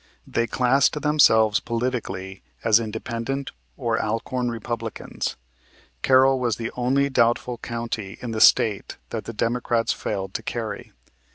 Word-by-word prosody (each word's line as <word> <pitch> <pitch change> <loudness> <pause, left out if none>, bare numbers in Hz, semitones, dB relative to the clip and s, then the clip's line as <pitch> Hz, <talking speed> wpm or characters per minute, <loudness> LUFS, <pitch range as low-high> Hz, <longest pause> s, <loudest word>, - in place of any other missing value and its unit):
They 115 0 -1
classed 135 +5 +2
themselves 110 -9 +4
politically 115 -6 -3 0.2
as 110 0 +5
Independent 115 +4 -4 0.3
or - - 0
Alcorn 120 +3 -2
Republicans. 115 -1 -4 0.7
Carroll 130 0 +5
was 120 -4 0
the 115 0 -4
only 130 +3 +2
doubtful 120 -2 +1
county 115 -5 -5
in 120 - -5
the 110 -1 -2
State 105 -3 +4
that - - -4
the - - -5
Democrats 115 0 0
failed 95 -2 -4
to - - -3
carry. - - -5
115 Hz, 125 wpm, -24 LUFS, 110-125 Hz, 0.7 s, as